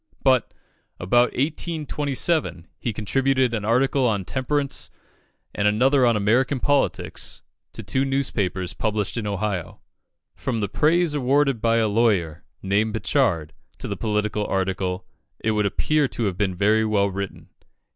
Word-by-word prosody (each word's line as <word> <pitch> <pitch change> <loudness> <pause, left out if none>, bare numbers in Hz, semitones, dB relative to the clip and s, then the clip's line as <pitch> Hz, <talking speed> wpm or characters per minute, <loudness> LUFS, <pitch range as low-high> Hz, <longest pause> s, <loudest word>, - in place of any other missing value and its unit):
But, 130 -2 +3 0.5
about 120 +7 +3
1827, 150 - -1
he 120 - -2
contributed 130 +4 +1
an 110 -3 -2
article 130 +4 +2
on 100 -4 -1
temperance 140 +3 -2 0.6
and 105 - +1
another 125 +5 +4
on 115 -2 +3
American 120 +6 +2
politics 145 +2 -1 0.3
to - - -7
two 130 - 0
newspapers, 105 -10 -1
published 105 -2 -2
in 115 -3 -3
Ohio. 100 -3 -3 0.5
From 120 -4 -3
the 100 - -1
praise 160 - +2
awarded 135 -2 +2
by 115 0 +2
a 110 -1 +2
lawyer, 100 -7 +1 0.2
named 105 +3 +1
Pritchard, 100 - 0 0.2
to - - -6
the - - -3
political 105 -1 -1
article, 95 -1 -2 0.3
it 110 - 0
would 105 -1 +1
appear 150 +8 +1
to 120 - -4
have 100 -4 0
been 95 -1 -1
very 105 +4 +3
well 105 -2 +2
written. 100 0 -6
110 Hz, 140 wpm, -23 LUFS, 100-135 Hz, 0.6 s, another